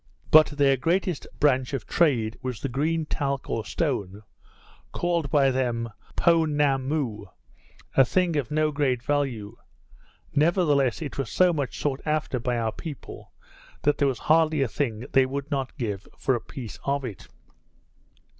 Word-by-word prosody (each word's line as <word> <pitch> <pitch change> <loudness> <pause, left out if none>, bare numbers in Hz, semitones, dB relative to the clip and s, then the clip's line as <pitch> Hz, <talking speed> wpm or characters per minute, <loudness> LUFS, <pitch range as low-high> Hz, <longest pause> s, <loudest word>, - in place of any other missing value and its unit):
But 155 0 +8
their 140 -2 +2
greatest 170 +3 0
branch 130 -2 +2
of 130 -7 -3
trade 120 -10 +2
was 125 -3 -4
the 140 - -3
green 155 +5 0
talc 140 -3 -2
or 115 - -1
stone, 105 - -2 0.7
called 170 -4 -1
by 135 -1 +4
them 120 -3 -1 0.2
Poenammoo, 145 - +1 0.7
a 135 - +7
thing 175 +5 +1
of 140 -6 -1
no 155 0 +1
great 135 -5 0
value; 125 -7 -2 0.8
nevertheless 150 - +2
it 145 - -6
was 135 - -2
so 180 -1 +3
much 140 -5 -3
sought 140 -2 -2
after 155 -4 -1
by 120 +1 -1
our 115 -1 0
people, 150 +2 -9 0.5
that 145 - +2
there 140 - +3
was 130 -3 -1
hardly 155 0 +3
a - - 0
thing 115 -1 -3
they 135 -1 +4
would 140 +2 -5
not 135 0 -2
give 105 -6 -4
for 135 - +1
a 120 - -1
piece 120 -5 -8
of 140 -1 -1
it. 105 -7 -8
140 Hz, 155 wpm, -26 LUFS, 125-150 Hz, 0.8 s, But